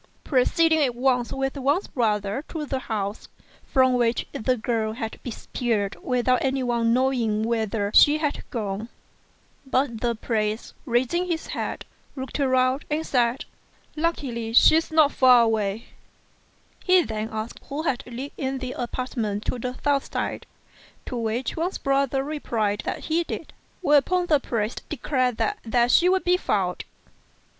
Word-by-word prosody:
pro 255 -4 +3
ceeding 320 0 +3
at 250 -3 0
once 250 -1 +1
with 270 +1 -2
Wang's 285 +7 +1
brother 210 0 -1
to 310 -2 -5
the 270 -2 -2
house, 210 -4 -4 0.4
from 260 -3 +3
which 240 -1 +1
the 255 +3 0
girl 220 -1 -1
had 225 -1 -5
disappeared 225 -3 -2
without 250 0 +1
anyone 245 -4 +1
knowing 240 -4 +1
whither 220 -3 -1
she 295 +1 +7
had 300 -2 -2
gone. 215 -2 -4 0.7
But 260 -4 -1
the 235 -1 0
priest, 215 -1 -2
raising 260 +9 +1
his 330 -2 -2
head, - - -4 0.3
looked 265 +1 -5
all 275 - +2
round, 255 +1 +2
and 310 +2 -1
said, 245 -1 +1 0.5
"Luckily 260 -8 -2
she's 315 +6 +6
not 315 -3 +4
far 250 -2 +6
off." 215 -1 0 1.0
He 365 -1 +5
then 220 -3 -4
asked 220 +1 -5
who 290 +3 -3
lived 275 -7 -1 0.3
in 265 0 -2
the 255 -1 -5
apartments 235 -4 -3
on 245 - -6
the 250 +1 -4
south 285 -1 +1
side, - - -3 0.6
to - - -5
which 230 +2 -2
Wang's 345 +4 -2
brother 275 -1 +1
replied 230 -8 -2
that - - -3
he 330 +2 0
did; - - -7 0.3
whereupon 350 +3 +3
the 305 -4 +3
priest 225 -4 -3
declared 255 -4 0
that 415 0 -1
there 235 +1 +2
she 345 +8 +5
would 375 0 +2
be 360 0 +3
found. 185 - -1
255 Hz, 150 wpm, -24 LUFS, 225-285 Hz, 1.0 s, she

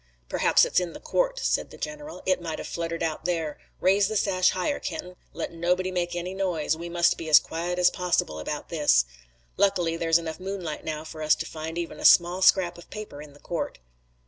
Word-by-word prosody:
"Perhaps - - +4
it's - - +2
in 175 -2 -4
the - - -9
court," - - 0
said - - 0
the - - -12
general. 300 0 -7
"It 185 -1 +2
might 165 -2 -4
have - - -6
fluttered 165 0 -3
out 160 -2 -3
there. 165 -4 -2 0.2
Raise 195 +1 +4
the 215 0 -1
sash 185 -2 +3
higher, 185 +10 -1
Kenton. 180 0 -6 0.2
Let - - -5
nobody 180 +2 0
make 175 -1 -2
any 175 +2 -4
noise. 180 -6 0
We 170 +2 -7
must 170 0 +2
be 160 - -5
as 150 - +9
quiet 175 +2 -2
as 180 0 +4
possible 175 - 0
about 150 - -5
this. 150 - +3 0.5
Luckily 180 -5 +2
there's 165 0 +3
enough 165 -1 -5
moonlight 185 -5 -5
now 155 -1 -4
for 160 0 -9
us 155 0 +4
to - - -5
find 160 +1 -6
even 170 -1 -4
a - - -4
small 175 +2 +6
scrap 180 -2 +4
of - - -15
paper 210 -9 -8
in 150 -1 -12
the 145 - -18
court." 170 - -4
175 Hz, 215 wpm, -26 LUFS, 160-185 Hz, 0.5 s, as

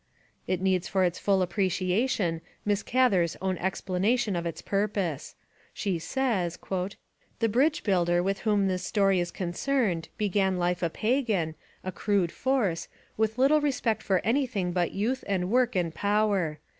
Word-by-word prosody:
It 185 -1 -1
needs 190 -1 +1
for 190 -1 +1
its 175 -1 0
full 195 -2 +2
appreciation 185 0 0 0.2
Miss 205 0 +1
Gather's 205 -10 +2
own 190 0 -1
explication 195 +4 0
of 170 0 -2
its 165 - -5
purpose. 195 -7 -2 0.4
She 190 -5 -1
says: 200 -5 -1
'The 195 +4 -5
bridge 275 +8 +2
builder 175 -3 +2
with 195 +1 -1
whom 205 -3 +2
this 185 -1 -1
story 195 -1 +2
is 175 0 -1
con 175 -1 -4
cerned 205 -9 0
began 195 -2 +1
life 175 0 0
a 170 - +1
pagan, 215 - 0 0.3
a 185 - -3
crude 190 -1 0
force, 240 -11 0 0.3
with 220 +1 0
little 285 +4 +4
respect 260 -6 0
for 190 -2 0
anything 230 -7 0
but 175 -1 +1
youth 235 +7 -1
and 185 -1 -1
work 250 -1 +2
and 170 -3 0
power. 200 -6 +1
195 Hz, 155 wpm, -28 LUFS, 180-220 Hz, 0.4 s, little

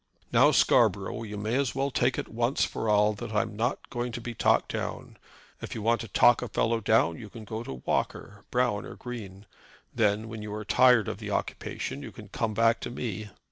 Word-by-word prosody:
"Now, - - +6
Scarborough, 115 +4 +3
you 105 -2 -6
may 105 +3 -2
as 135 -1 0
well 135 +1 0
take 125 0 +1
it - - -3
once 120 +4 +1
for 110 - -3
all 105 0 +4
that 105 - -7
I 105 - +4
am 110 -3 -8
not 115 +3 -2
going 120 0 -2
to 120 - -4
be 120 0 -6
talked - - +2
down. - - -5 0.4
If - - -6
you 110 - -5
want 115 +1 +2
to 115 - -6
talk 120 +4 +5
a 125 - -3
fellow 115 0 +1
down 105 -6 +2
you 105 - -9
can 110 +1 -10
go 110 +2 -5
to 65 - -8
Walker, 100 0 -2
Brown, 125 -5 +1
or - - -9
Green. 105 -5 -8 0.5
Then 110 -1 +1
when 110 -1 -7
you 105 0 -5
are 105 0 -6
tired 120 +1 +5
of - - -4
the - - -6
occupation - - -3
you - - -8
can - - -12
come 110 -2 -2
back 115 +1 +3
to - - -5
me." 110 -4 -5
110 Hz, 220 wpm, -28 LUFS, 105-120 Hz, 0.5 s, Now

